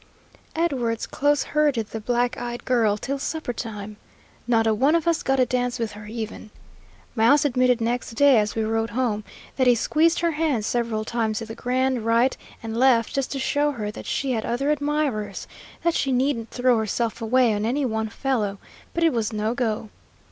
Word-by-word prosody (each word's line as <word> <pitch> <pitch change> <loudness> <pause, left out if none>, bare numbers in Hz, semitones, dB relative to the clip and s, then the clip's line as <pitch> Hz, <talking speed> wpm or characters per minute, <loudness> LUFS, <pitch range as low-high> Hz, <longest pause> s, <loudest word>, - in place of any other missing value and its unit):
Edwards 255 -9 0
close 290 0 +1
herded 290 -8 +1
the 220 - -5
black 245 +2 0
eyed 240 0 -6
girl 225 -5 +2
till 275 +6 -3
supper 310 -3 -3
time. 210 -3 -6 0.5
Not 225 -2 +3
a 220 - +3
one 275 +9 +3
of 335 -1 0
us 335 -1 +2
got 270 0 +1
a 255 - +5
dance 245 -1 -1
with 230 -2 -2
her 210 0 -10
even. 220 -1 -6 0.7
Mouse 275 +7 +4
admitted 250 -2 +3
next 235 +1 -2
day, 275 -2 +6
as 210 0 -1
we 225 - 0
rode 225 +1 0
home, 220 -2 -1 0.3
that 260 -2 +3
he 245 - +6
squeezed 325 +9 +2
her 340 -1 +2
hand 300 -8 0
several 230 -2 -1
times 225 -2 -1
in 225 - -7
the 225 - -6
grand 255 0 0
right 230 +3 +3 0.3
and 225 0 -4
left, 240 -2 +3
just 275 -1 -1
to - - -3
show 290 +2 +1
her 210 -4 -4
that - - -9
she 275 -2 -1
had 225 -3 -1
other 275 +5 0
admirers, 285 -9 -1 0.4
that 340 0 +2
she 275 - 0
needn't 255 -3 0
throw 245 -2 +2
herself 225 +2 -2
away 235 0 +3
on 205 0 -2
any 265 +5 0
one 220 -2 -1
fellow, 215 -5 -1 0.4
but 335 - +1
it 330 - +4
was 230 -2 -1
no 215 +1 -1
go. 225 -3 -2
240 Hz, 195 wpm, -24 LUFS, 220-270 Hz, 0.7 s, day